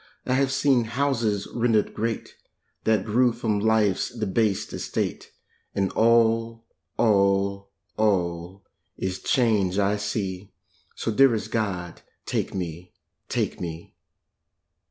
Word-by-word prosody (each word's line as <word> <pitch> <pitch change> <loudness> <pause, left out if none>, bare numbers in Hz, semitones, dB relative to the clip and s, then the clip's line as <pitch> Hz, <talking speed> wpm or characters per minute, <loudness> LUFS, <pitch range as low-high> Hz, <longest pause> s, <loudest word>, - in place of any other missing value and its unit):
I 130 - 0
have 135 0 +2
seen 135 -3 +3
houses 115 -5 0
rendered 115 -3 +1
great 115 +1 -3 0.5
That 110 -3 +2
grew 120 +3 +3
from 115 -3 -1
life's 110 -2 +2
debased 110 -2 -1
estate, - - -3 0.4
And 95 -1 0
all, 115 0 +2 0.3
all, 100 -2 +2 0.3
all 90 -3 0 0.3
is 95 0 -3
change 105 -7 +2
I 100 +1 +2
see, 100 -2 -4 0.4
So, - - -2
dearest 115 -1 +3
God, 95 -6 -3 0.2
take - - -2
me, 90 -1 -5 0.4
take - - -1
me. 85 -1 -6
105 Hz, 110 wpm, -25 LUFS, 95-115 Hz, 0.5 s, seen